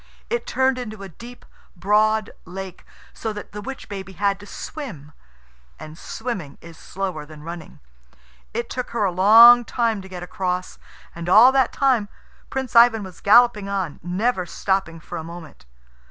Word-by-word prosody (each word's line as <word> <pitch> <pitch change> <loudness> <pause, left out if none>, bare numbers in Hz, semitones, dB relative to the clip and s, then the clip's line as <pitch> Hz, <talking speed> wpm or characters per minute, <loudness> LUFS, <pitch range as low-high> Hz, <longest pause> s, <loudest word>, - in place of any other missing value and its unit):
It 475 - -2
turned 260 -1 +1
into 215 -4 -7
a 195 - -8
deep, 235 +8 -13 0.3
broad 215 +3 +2
lake, 190 0 -9 0.3
so 220 - -4
that 210 - -9
the 210 - -7
witch 265 +4 -8
baby 195 -1 -7
had 200 +1 0
to 205 - -13
swim 195 - -8 0.7
and 155 0 -10
swimming 185 - -6
is 165 0 -13
slower 185 -3 -5
than 150 0 -13
running. 170 0 -9 0.7
It 235 +1 -3
took 250 +1 -5
her 210 - +1
a 190 - +1
long 225 +6 +8
time 230 -3 -1
to 190 - -12
get 180 -1 -7
across, 180 0 -4 0.3
and 170 +1 -6
all 225 +7 +8
that 265 -1 +2
time 250 -7 +1 0.4
Prince 265 -2 -4
Ivan 230 -2 +6
was 185 -3 -11
galloping 210 -2 +4
on, 190 -7 -3
never 185 +2 -1
stopping 190 -3 -2
for 170 +2 -7
a - - -6
moment. 165 - -11
200 Hz, 165 wpm, -22 LUFS, 175-235 Hz, 0.7 s, long